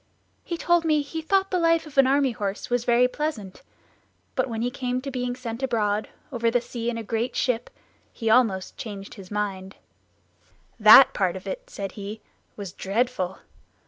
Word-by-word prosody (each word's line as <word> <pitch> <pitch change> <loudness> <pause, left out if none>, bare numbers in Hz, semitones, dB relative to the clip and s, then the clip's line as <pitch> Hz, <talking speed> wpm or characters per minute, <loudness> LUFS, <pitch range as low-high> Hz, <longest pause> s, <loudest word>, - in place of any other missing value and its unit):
He 340 - -4
told 345 0 +2
me 305 -2 +2
he 320 +3 -5
thought 385 +4 +1
the 365 - +1
life 330 -1 +3
of 305 -2 -13
an 270 -1 +6
army 275 -1 +3
horse 205 0 -4
was 245 -1 +1
very 240 +1 +4
pleasant; 250 -9 -4 0.7
but - - 0
when 225 0 -3
it 245 +1 -2
came 250 -1 -2
to 275 +2 -6
being 250 -1 -2
sent 240 -1 -6
abroad 215 -5 0 0.2
over 235 -2 +1
the 245 +1 +2
sea 235 0 -4
in 235 - -3
a 230 - -4
great 230 +3 -2
ship, 245 -2 0 0.4
he 225 - -6
almost 220 -5 +2
changed 200 -3 -7
his 195 -4 -12
mind. 195 -2 -3 1.0
"That 220 +5 +9
part 185 -3 0
of 190 - -8
it," - - -6
said 195 - -5
he, 205 +2 -7 0.4
"was 200 -4 -7
dreadful! 195 -2 -1
240 Hz, 180 wpm, -25 LUFS, 210-270 Hz, 1.0 s, That